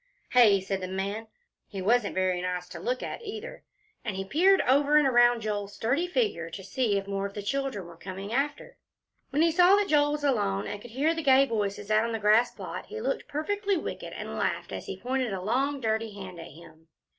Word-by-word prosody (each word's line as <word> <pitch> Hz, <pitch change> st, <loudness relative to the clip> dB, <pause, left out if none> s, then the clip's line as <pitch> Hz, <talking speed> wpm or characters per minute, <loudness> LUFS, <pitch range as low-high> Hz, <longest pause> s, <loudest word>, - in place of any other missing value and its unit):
"Hey?" 220 Hz, -6 st, +6 dB
said 195 Hz, 0 st, -3 dB
the 185 Hz, -, -3 dB
man. 200 Hz, +4 st, -3 dB, 0.4 s
He 195 Hz, -, -7 dB
wasn't 215 Hz, +3 st, +1 dB
very 185 Hz, -1 st, +1 dB
nice 180 Hz, -1 st, -3 dB
to -, -, -8 dB
look 255 Hz, +1 st, -2 dB
at -, -, -5 dB
either, 445 Hz, +2 st, -7 dB, 0.4 s
and 210 Hz, -5 st, -3 dB
he 195 Hz, 0 st, -3 dB
peered 370 Hz, -, +4 dB
over 285 Hz, +3 st, +4 dB
and 300 Hz, -2 st, +5 dB
around 240 Hz, -2 st, +4 dB
Joel's 205 Hz, -2 st, -3 dB
sturdy 275 Hz, +10 st, 0 dB
figure, 365 Hz, -, -1 dB
to 190 Hz, -, -8 dB
see 210 Hz, +1 st, 0 dB
if 195 Hz, -, -3 dB
more 200 Hz, 0 st, -2 dB
of 200 Hz, -, -14 dB
the 205 Hz, -, -5 dB
children 270 Hz, -4 st, -2 dB
were 170 Hz, -1 st, -12 dB
coming 195 Hz, +4 st, -7 dB
after. 290 Hz, -, -2 dB, 0.5 s
When 295 Hz, +3 st, +2 dB
he 335 Hz, -, +4 dB
saw 360 Hz, +3 st, +6 dB
that 410 Hz, -1 st, +1 dB
Joel 290 Hz, -1 st, +3 dB
was 295 Hz, -1 st, -4 dB
alone, 205 Hz, -8 st, +1 dB
and 205 Hz, -, -5 dB
could 240 Hz, -, -11 dB
hear 280 Hz, +8 st, +1 dB
the 325 Hz, -, -3 dB
gay 270 Hz, -2 st, +5 dB
voices 205 Hz, -3 st, -3 dB
out 215 Hz, +1 st, +4 dB
on 230 Hz, 0 st, -2 dB
the -, -, 0 dB
grass 215 Hz, +3 st, +4 dB
plot, -, -, -7 dB
he 445 Hz, -, -6 dB
looked -, -, -2 dB
perfectly 400 Hz, +6 st, -1 dB
wicked, -, -, -6 dB
and -, -, -6 dB
he -, -, -6 dB
laughed -, -, -2 dB
as -, -, -6 dB
he -, -, -5 dB
pointed 255 Hz, -3 st, -1 dB
a 190 Hz, -, -3 dB
long 265 Hz, +7 st, +1 dB
and 270 Hz, -, -10 dB
dirty 220 Hz, -1 st, -1 dB
hand 185 Hz, -3 st, -8 dB
at 165 Hz, -, -8 dB
him. 160 Hz, 0 st, -16 dB
230 Hz, 230 wpm, -28 LUFS, 195-290 Hz, 0.5 s, Hey